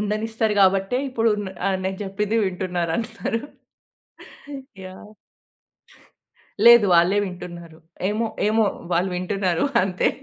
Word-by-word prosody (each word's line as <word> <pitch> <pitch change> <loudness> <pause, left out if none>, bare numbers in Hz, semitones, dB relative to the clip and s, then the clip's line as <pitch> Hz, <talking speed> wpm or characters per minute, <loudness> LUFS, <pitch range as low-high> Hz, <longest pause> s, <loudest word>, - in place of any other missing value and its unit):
ఉండనిస్తారు 215 +1 -1
గాబట్టే 195 +4 +3
ఇప్పుడు 230 -3 +1
న - - -5 0.2
ఆహ్, 190 -1 0
నేను 190 0 -2
చెప్పింది 205 +3 -2
వింటున్నారు 180 -3 -2
అందరూ. 230 0 -3 1.4
యాహ్! 190 +3 -11 1.5
లేదు. 235 -2 +9
వాళ్ళే 175 +4 +4
వింటున్నారు. 175 -3 -9 0.3
ఏమో, 215 +3 -1 0.2
ఏమో. 220 +1 +3 0.3
వాళ్ళు 180 +3 +1
వింటున్నారు 185 -1 -1 0.2
అంతే. 185 -1 0
195 Hz, 105 wpm, -22 LUFS, 180-220 Hz, 1.5 s, లేదు